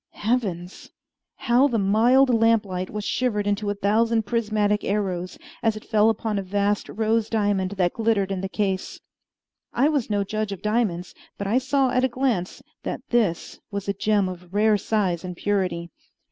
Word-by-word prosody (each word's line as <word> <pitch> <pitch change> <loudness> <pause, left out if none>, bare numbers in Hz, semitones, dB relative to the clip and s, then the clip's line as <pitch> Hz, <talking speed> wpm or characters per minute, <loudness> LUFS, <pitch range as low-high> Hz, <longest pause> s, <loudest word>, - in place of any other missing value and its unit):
Heavens! 200 -6 -2 0.5
How 250 +3 +3
the 240 -5 -1
mild 235 +7 +4
lamplight 215 -5 +2
was 210 0 -5
shivered 220 -5 0
into 205 0 -1
a 205 - -1
thousand 220 +3 +2
prismatic 210 -2 0
arrows 185 -3 -2 0.2
as 220 -2 +1
it 215 - -11
fell 215 -1 +3
upon 220 -1 -1
a - - -2
vast 205 +2 -1
rose 220 0 0
diamond 205 -3 0
that 180 -2 +1
glittered 220 -4 0
in 190 -1 -2
the 195 - -3
case! 195 -2 -2 0.7
I 270 +5 +3
was 285 -8 -1
no 205 -1 +1
judge 215 +1 -3
of 195 - -7
diamonds, 210 -5 -1 0.2
but 200 - -4
I 220 +6 +2
saw 265 0 +1
at 255 0 +1
a - - +4
glance 240 -8 -2 0.2
that - - -4
this 215 -8 0
was 200 -1 -5
a 200 - +1
gem 205 0 +1
of 180 -1 -8
rare 215 +1 +4
size 195 -5 -1
and 180 -1 -6
purity. 180 -4 -1
210 Hz, 175 wpm, -24 LUFS, 195-225 Hz, 0.7 s, mild